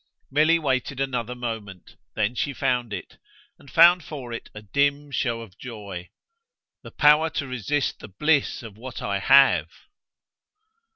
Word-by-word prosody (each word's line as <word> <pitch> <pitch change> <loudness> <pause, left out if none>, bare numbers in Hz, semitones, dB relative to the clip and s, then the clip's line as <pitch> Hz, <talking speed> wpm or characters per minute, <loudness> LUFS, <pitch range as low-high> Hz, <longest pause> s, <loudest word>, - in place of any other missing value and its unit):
Milly 155 +4 +4
waited 135 -3 -1
another 125 -3 -2
moment; 110 -6 -7 0.2
then 110 +1 0
she 140 +3 -2
found 125 -4 0
it, 95 -3 -7 0.4
and 140 - -16
found 170 +3 +6
for 135 -6 -7
it 115 - -7
a 105 - -9
dim 140 +6 0
show 120 -3 -1
of 105 -4 -13
joy. 100 -7 -8 0.7
"The - - -11
power 150 +2 +4
to 150 - -3
resist 130 +3 -2
the - - -10
bliss 145 +8 0
of 110 -3 -10
what 125 +2 -8
I 100 -1 -1
HAVE!" 135 +6 +5
125 Hz, 150 wpm, -24 LUFS, 110-145 Hz, 0.7 s, found